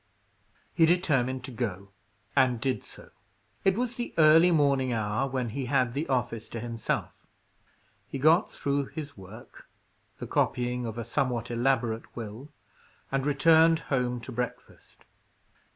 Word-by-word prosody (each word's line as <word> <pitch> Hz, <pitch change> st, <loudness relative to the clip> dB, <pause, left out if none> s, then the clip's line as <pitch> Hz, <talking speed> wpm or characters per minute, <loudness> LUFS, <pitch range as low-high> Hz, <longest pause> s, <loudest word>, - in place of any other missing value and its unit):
He 165 Hz, -2 st, +4 dB
determined 135 Hz, -8 st, +1 dB
to 130 Hz, -, -7 dB
go, 100 Hz, -5 st, -4 dB, 0.5 s
and 130 Hz, -4 st, +3 dB
did 130 Hz, +2 st, -1 dB
so. -, -, -13 dB, 0.5 s
It 195 Hz, +1 st, +3 dB
was 245 Hz, 0 st, -2 dB
the 240 Hz, -, -5 dB
early 160 Hz, +2 st, +7 dB
morning 140 Hz, -5 st, +2 dB
hour, 110 Hz, +4 st, -1 dB
when 130 Hz, -2 st, -2 dB
he 130 Hz, +4 st, -4 dB
had 125 Hz, -2 st, +1 dB
the 145 Hz, +4 st, -2 dB
office 115 Hz, -4 st, -2 dB
to 115 Hz, -, -5 dB
himself. 115 Hz, -1 st, -3 dB, 1.0 s
He -, -, -5 dB
got 160 Hz, +8 st, +4 dB
through 140 Hz, 0 st, -1 dB
his 150 Hz, 0 st, -8 dB
work 100 Hz, +5 st, -13 dB, 0.5 s
the -, -, -6 dB
copying 125 Hz, 0 st, -1 dB
of 110 Hz, 0 st, -6 dB
a 115 Hz, -, -4 dB
somewhat 120 Hz, -2 st, -1 dB
elaborate 120 Hz, -2 st, -1 dB
will 115 Hz, +5 st, -7 dB, 0.6 s
and 135 Hz, +1 st, 0 dB
returned 160 Hz, +3 st, +5 dB, 0.2 s
home 125 Hz, -2 st, 0 dB
to 130 Hz, -, -8 dB
breakfast. 125 Hz, 0 st, -7 dB
130 Hz, 140 wpm, -28 LUFS, 120-145 Hz, 1.0 s, early